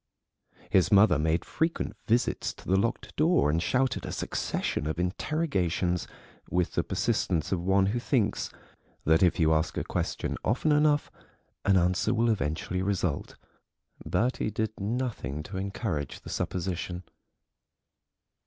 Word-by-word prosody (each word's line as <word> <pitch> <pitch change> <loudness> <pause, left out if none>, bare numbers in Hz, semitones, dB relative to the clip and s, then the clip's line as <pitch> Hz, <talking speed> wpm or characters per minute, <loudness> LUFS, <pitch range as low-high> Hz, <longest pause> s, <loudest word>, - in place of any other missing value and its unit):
His 95 +2 +4
mother 100 -2 +6
made 80 +2 +1
frequent 165 +1 -1
visits 120 +2 +1
to - - -14
the 95 - +3
locked 110 +4 -1
door 160 - +4
and 80 +2 +1
shouted 130 +7 +1
a - - -5
succession 75 - -2
of 80 - -2
interrogations 90 - 0 0.4
with 90 -1 +1
the - - 0
persistence 80 -4 0
of 95 -3 0
one 95 +2 +3
who 110 +5 0
thinks 115 -5 0 0.6
that 80 +1 +4
if 90 0 +3
you 80 -1 +4
ask 80 0 0
a - - 0
question - - -2
often 130 +7 +1
enough 150 0 +3 0.5
an 100 -1 +5
answer 90 +5 +2
will 115 0 +3
eventually 85 0 -1
result. 95 -6 -1 0.7
Bertie 120 -1 0
did 110 +1 -3
nothing 100 - -3
to 95 +4 -7
encourage 95 - -3
the - - -10
supposition. 90 0 -3
95 Hz, 135 wpm, -28 LUFS, 85-115 Hz, 0.7 s, mother